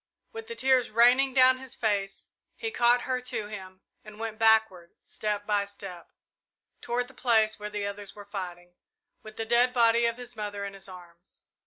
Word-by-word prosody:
With 450 -1 -8
the 465 - -6
tears 260 - +2
raining 250 +4 +4
down 255 0 +6
his 265 0 -9
face 200 -3 -2 0.3
he 450 -1 -4
caught 245 - +3
her 255 -1 -2
to 240 -4 -4
him, 190 -2 -9 0.2
and 215 -1 -12
went 225 -1 -5
backward, 220 -6 +3
step 210 -1 -3
by 205 -1 +1
step, 195 -4 -10 0.7
toward 245 +1 -1
the 270 - -14
place 220 -4 +2
where 210 0 -5
the 210 -1 -3
others 200 0 -7
were 205 -1 -11
fighting, 180 -3 -7 0.5
with 215 0 -12
the 225 - -3
dead 240 +2 +3
body 235 -1 +4
of 230 0 -2
his 245 -1 -9
mother 205 -2 -4
in 200 - -6
his 195 0 -7
arms. 175 -1 -14
220 Hz, 185 wpm, -28 LUFS, 200-245 Hz, 0.7 s, down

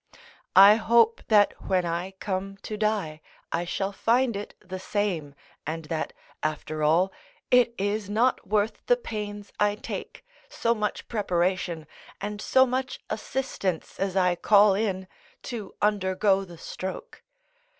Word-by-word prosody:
I 200 +3 +9
hope 230 0 +4
that 210 -2 +5
when 185 -2 +2
I 175 +3 -3
come 195 0 -3
to 215 - -4
die 205 -8 -1 0.3
I 170 +1 -1
shall 195 +3 -2
find 235 +3 +2
it 205 +1 -6
the 185 +1 -7
same, 185 -8 -2 0.3
and 160 +1 -4
that, 155 0 -3 0.3
after 155 0 -3
all, 170 +6 +3 0.4
it 245 -1 +5
is 205 +1 -1
not 230 +5 +1
worth 210 +2 0
the - - +5
pains 210 - -6
I 205 0 +3
take, 210 - -7 0.2
so 230 - +1
much 210 -2 -3
preparation 180 -5 -1 0.3
and 205 +1 -5
so 260 +3 +5
much 260 +1 -2
assistance 215 -6 -3
as 195 -1 -1
I 180 -2 +3
call 205 +2 +5
in, 190 -2 -1 0.4
to 220 -6 -6
undergo 195 -1 +2
the 175 -2 -12
stroke. 190 - -7
200 Hz, 140 wpm, -26 LUFS, 185-215 Hz, 0.4 s, I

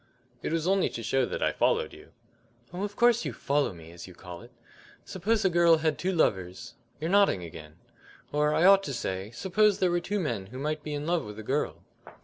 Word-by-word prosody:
"It - - -3
was 165 0 -1
only 195 0 +2
to 115 - -6
show 125 +2 +1
that - - -3
I - - +2
followed - - +1
you." - - -15 0.6
"Oh, 180 - -5
of 205 0 -4
course 240 -1 +4
you - - -4
'follow 140 -2 0
me,' 85 -2 -12
as 85 +1 -10
you 90 - -13
call 90 -1 -10
it. 120 - -14 0.6
Suppose 210 +3 -1
a - - +5
girl 170 -1 +5
had 155 -1 -1
two 185 - 0
lovers 95 - -1 0.3
you're 160 - -2
nodding 195 - +3
again 75 -2 -10 0.6
or, 150 +1 +2
I 165 - +3
ought 195 0 +7
to 140 - -4
say, 95 -3 -4
suppose 195 - +2
there 185 -2 +2
were 175 - +1
two 205 +4 -2
men 115 - -3
who 125 +6 -10
might 150 +2 -2
be 150 0 -5
in 145 +1 -4
love 170 -1 0
with 105 0 -9
a 110 - -7
girl." 140 +7 -2
150 Hz, 225 wpm, -28 LUFS, -, 0.6 s, ought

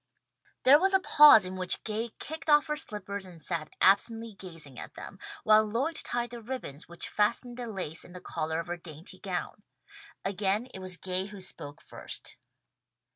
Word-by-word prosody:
There 280 +3 +8
was 385 +2 +3
a - - +6
pause 295 - +8
in 185 +1 -6
which 185 -1 +2
Gay 225 +2 -2
kicked 315 +1 -4
off 295 0 +6
her 300 -1 -1
slippers 205 -8 -2
and 180 -3 -9
sat 160 -1 -3
absently 225 +3 +3
gazing 165 -9 -9
at - - -9
them, - - -10 0.2
while 215 0 +6
Lloyd 235 +10 -1
tied 240 -3 -1
the 240 -1 -7
ribbons 220 - -6
which 170 0 -3
fastened 235 +4 0
the 245 -1 -5
lace 185 -7 -2
in 175 - -13
the 180 - -8
collar 160 -2 -3
of 165 - -4
her 175 0 -4
dainty 160 0 -9
gown. - - -4 0.6
Again 200 +3 +1
it - - -4
was 185 -1 -6
Gay 185 +1 -1
who 205 -1 -10
spoke 145 -6 -8
first. - - -7
200 Hz, 185 wpm, -29 LUFS, 180-240 Hz, 0.6 s, There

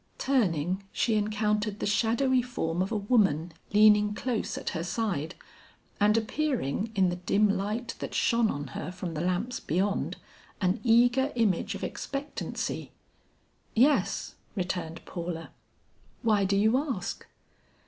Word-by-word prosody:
Turning, 190 - +1
she 230 - +1
encountered 210 0 0
the - - -3
shadowy 235 +5 +2
form 180 -9 -2
of 190 - -1
a 220 - +1
woman 195 - +2 0.2
leaning 210 0 +5
close 240 -2 -2
at - - -3
her 165 -2 -3
side 175 -4 -2 0.6
and 210 +2 +4
appearing 225 - -1
in 190 -2 +4
the 175 - -3
dim 200 +4 +2
light 210 +4 -2
that - - -5
shone 230 -2 +3
on 145 -5 -4
her 155 - -5
from 180 -2 -5
the 155 - -3
lamps 185 +8 -1
beyond, 195 +6 -1 0.4
an 185 -1 +1
eager 245 +3 +4
image 215 -7 +1
of - - -7
expectancy. 280 +1 -4 0.9
"Yes," 270 +6 +2 0.2
returned 175 -3 -3
Paula, 170 -2 -5 0.7
"why 210 -3 +3
do 195 +1 +2
you 220 +5 +4
ask?" 255 - -4
210 Hz, 135 wpm, -28 LUFS, 180-230 Hz, 0.9 s, leaning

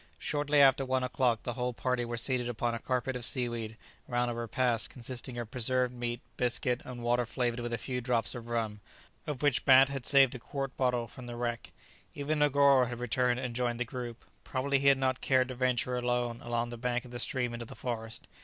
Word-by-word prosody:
Shortly 145 0 +1
after 135 0 +5
one 130 0 0
o'clock 125 -3 +1
the 120 - -3
whole 125 0 -2
party 125 0 -1
were 120 0 -4
seated 125 0 0
upon 120 0 -1
a 115 - -3
carpet 130 +2 -2
of 125 - -4
seaweed 120 -3 +1 0.3
round 120 0 0
a - - -3
repast 120 0 +1
consisting 125 0 -5
of 115 -2 -5
preserved 125 0 +1
meat, 120 0 -4 0.2
biscuit, 125 +1 +1
and 120 -2 -8
water 120 +1 +2
flavoured 120 0 -2
with 120 0 -4
a 115 - -1
few 125 0 -4
drops 120 -2 0
of 120 -2 -8
rum, 110 -3 -2 0.5
of 150 -2 -4
which 145 -4 +3
Bat 135 0 +7
had 135 -2 -4
saved 135 -2 +6
a 125 - -6
quart 135 +2 -5
bottle 125 -2 0
from 125 +2 -11
the 120 - -6
wreck. 120 -1 -3 0.4
Even 150 +2 -1
Negoro 140 -2 +5
had 120 0 -5
returned 125 +1 +1
and 125 -3 -4
joined 120 -1 -1
the 125 - 0
group; 120 -1 -7 0.2
probably 140 +1 0
he 140 - +1
had 140 -1 +6
not 130 -1 0
cared 130 -1 +2
to - - -4
venture 125 0 0
alone 120 -1 -1
along 120 0 -2
the 120 - -7
bank 125 +1 -2
of 125 - -12
the 120 - -5
stream 125 -4 0
into 120 -1 -6
the - - -10
forest. 115 -2 -5
125 Hz, 220 wpm, -31 LUFS, 120-130 Hz, 0.5 s, Bat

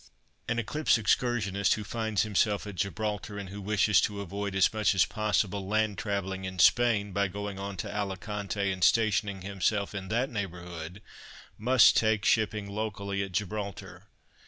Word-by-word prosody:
An 115 - -1
Eclipse 125 +5 +1
excursionist 105 -3 +1
who 110 - -5
finds 110 -1 -1
himself 105 -1 +1
at 105 - -6
Gibraltar, 105 +1 -3
and 100 -2 -6
who 100 +1 -7
wishes 105 0 +3
to 105 -1 -2
avoid 100 +1 -4
as 95 +2 +3
much 105 -2 +2
as 95 - +5
possible 100 -3 -1
land 110 0 0
travelling 95 -2 -3
in 95 0 -5
Spain 105 +1 +4
by 100 +1 +1
going 100 +1 -6
on 100 0 -5
to 105 0 -5
Alicante 100 0 -2
and 95 -1 -3
stationing 105 -1 +2
himself 100 +1 -1
in 95 -1 -5
that 120 +7 0
neighbourhood, 90 -2 -6 0.5
must 125 +2 +5
take 110 -2 +2
shipping 110 -2 +2
locally 100 -1 -3
at 95 -1 -4
Gibraltar. 100 +1 -5
100 Hz, 160 wpm, -29 LUFS, 95-110 Hz, 0.5 s, as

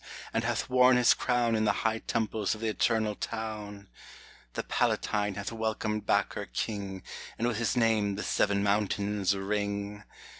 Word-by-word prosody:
and - - +1
hath - - -1
worn 125 0 +5
his 125 -1 +6
crown 120 -2 +1
In 110 - +1
the 110 - +4
high 110 0 +2
temples 110 -2 -1
of 110 - -11
the 115 - 0
Eternal 110 +1 +1
Town! 105 -2 -5 0.7
The - - -3
Palatine 105 -1 0
hath 100 +2 -4
welcomed 110 -1 -2
back - - +2
her - - -5
king, 100 -3 -4 0.3
And 115 - 0
with 120 -3 -1
his 115 +2 0
name 110 -4 +2
the 105 - -4
seven 100 -1 +1
mountains 100 -1 +1
ring 100 +1 -2
105 Hz, 160 wpm, -29 LUFS, 100-115 Hz, 0.7 s, his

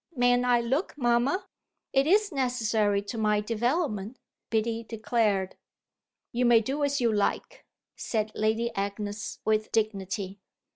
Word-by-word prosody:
"Mayn't 245 0 +3
I 245 -1 +4
look, 270 +8 -1
mamma? 250 +8 +1 0.5
It 270 +1 +3
is 410 +3 +3
necessary 225 -7 +1
to 215 +3 -5
my 210 -1 +2
development," 230 - -1 0.3
Biddy 225 +1 0
declared. 215 -4 0 0.7
"You 245 0 0
may 240 -2 +6
do 270 +7 -2
as 285 0 +1
you 235 -3 +2
like," 205 -1 -2 0.3
said 215 -2 -2
Lady 220 +2 0
Agnes 205 +2 -4
with 215 0 +1
dignity. 200 -2 -2
230 Hz, 130 wpm, -28 LUFS, 210-250 Hz, 0.7 s, may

